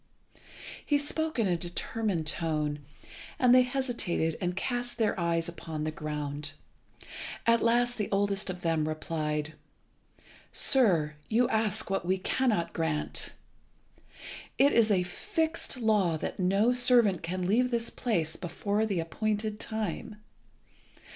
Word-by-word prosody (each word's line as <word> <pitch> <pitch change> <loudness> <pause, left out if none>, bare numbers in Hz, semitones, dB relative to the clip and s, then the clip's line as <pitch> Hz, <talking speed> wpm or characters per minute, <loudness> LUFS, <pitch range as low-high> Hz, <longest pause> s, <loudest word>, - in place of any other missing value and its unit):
He 290 - +2
spoke 315 +2 -2
in 225 - +2
a 180 -2 +2
determined 175 +1 -2
tone, 150 -2 -1 0.6
and 250 -1 +5
they 255 - +8
hesitated 245 - -1
and 180 -1 -1
cast 245 +4 -3
their 220 -4 +1
eyes 170 -1 0
upon 160 -2 -5
the 155 - -1
ground. 150 -1 -4 0.9
At 230 0 +4
last 240 +1 +2
the 210 - -1
oldest 200 0 +1
of 180 -1 -5
them 160 -2 +1
replied 155 -1 -2 1.0
"Sir, 180 - +3 0.2
you 235 +2 +3
ask 220 -2 0
what 195 - 0
we 185 +2 +1
cannot 190 -4 0
grant. 160 -2 -1 1.2
It 280 +1 +5
is 230 -2 +4
a 190 -3 +3
fixed 320 - -2
law 210 -8 +2
that - - -5
no 195 +6 +3
servant 240 -7 +4
can 180 +2 -3
leave 240 +7 +3
this 235 -1 -1
place 165 -10 -1
before 205 +5 -1
the 195 -5 -1
appointed 210 +5 -2
time. 220 -1 -3
195 Hz, 130 wpm, -29 LUFS, 165-235 Hz, 1.2 s, they